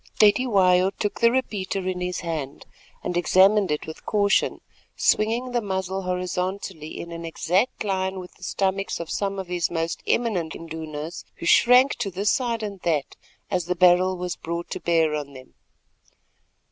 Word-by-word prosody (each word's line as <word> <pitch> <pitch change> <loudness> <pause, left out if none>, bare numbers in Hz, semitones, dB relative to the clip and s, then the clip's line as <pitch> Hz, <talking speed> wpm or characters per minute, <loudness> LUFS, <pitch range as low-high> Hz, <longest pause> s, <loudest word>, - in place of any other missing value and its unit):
Cetywayo 195 -4 +4
took 205 - -3
the 235 - +7
repeater 200 -7 -2
in 180 -1 -2
his 180 0 -2
hand, 155 -5 -5 0.4
and 180 - -3
examined 190 +3 +4
it 150 0 -1
with 160 - -9
caution, 205 -2 +2 0.4
swinging 235 +4 +1
the 240 -1 0
muzzle 190 -1 -2
horizontally 180 -2 -3
in 170 - -7
an 170 0 -6
exact 180 +9 0
line 190 -1 -1
with 180 -1 -8
the - - -26
stomachs 195 +1 -1
of 170 - -6
some 200 -1 -2
of 190 - -4
his 175 -1 -1
most 165 -1 -2
eminent 190 -9 0
Indunas, 160 0 -6
who - - -8
shrank 250 +8 +6
to 195 - -2
this 195 +3 0
side 235 -3 -1
and 200 -2 -5
that 155 -5 -1 0.4
as 180 -3 0
the 180 +1 -1
barrel 180 +1 +4
was 180 -1 -3
brought 170 +1 -5
to - - -3
bear 165 -2 +2
on 145 -2 -4
them. 130 -1 -13
185 Hz, 165 wpm, -24 LUFS, 170-200 Hz, 0.4 s, the